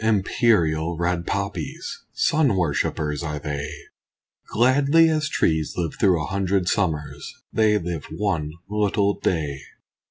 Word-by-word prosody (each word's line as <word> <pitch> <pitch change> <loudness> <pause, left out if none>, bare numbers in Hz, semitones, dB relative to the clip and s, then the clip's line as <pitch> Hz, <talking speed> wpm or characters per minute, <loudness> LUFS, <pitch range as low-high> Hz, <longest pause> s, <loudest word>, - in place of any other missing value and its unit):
Imperial 90 -6 +2
red 85 0 -1
poppies! 100 -5 -4
Sun 145 -9 +2
worshippers 75 -2 -1
are 75 -3 -3
they; 75 -1 -4 0.8
Gladly 140 +7 +4
as 155 -2 0
trees 80 -1 0
live 85 -4 -1
through 95 -5 +4
a 75 - -2
hundred 95 -1 0
summers 80 -8 -1 0.2
They 110 -1 +3
live 85 -5 -4
one 85 -4 -2 0.2
little 100 -1 +1
day. 75 -5 -1
90 Hz, 120 wpm, -23 LUFS, 80-105 Hz, 0.8 s, Gladly